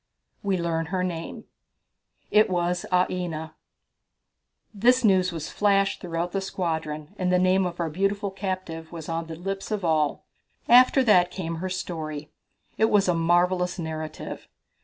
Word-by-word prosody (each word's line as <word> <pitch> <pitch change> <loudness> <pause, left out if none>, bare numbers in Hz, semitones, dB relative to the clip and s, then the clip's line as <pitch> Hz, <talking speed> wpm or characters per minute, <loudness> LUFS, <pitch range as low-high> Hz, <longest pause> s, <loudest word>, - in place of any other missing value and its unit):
We 195 -2 0
Learn 165 -1 -1
Her 180 +1 -1
Name. 170 -2 -5 0.9
It 215 0 +5
was 175 0 0
Aina - - -12 0.2
(pronounced - - -9
Ah - - -2
ee 180 -1 -2
na). 160 -1 -5 1.2
This 245 +5 +3
news 185 -4 +4
was 165 -2 -5
flashed 195 -1 +2
throughout 170 -1 -3
the 195 - -1
squadron, 160 -4 -3
and 180 -1 +1
the 180 - +4
name 185 +1 +3
of 175 0 -7
our 165 -2 -1
beautiful 195 +3 -1
captive 185 -4 -5
was 165 -3 -8
on 165 0 -3
the 165 - -6
lips 195 +3 -5
of 210 -4 -2
all. 155 -3 +1 0.4
After 255 +2 +6
that 180 -7 +5
came 165 -3 -4
her 185 +3 -3
story. 155 -5 -5 0.5
It 220 - +5
was 200 -2 +3
a 180 - +3
marvellous 180 +2 +2
narrative. 160 -2 -6
180 Hz, 165 wpm, -25 LUFS, 165-195 Hz, 1.2 s, After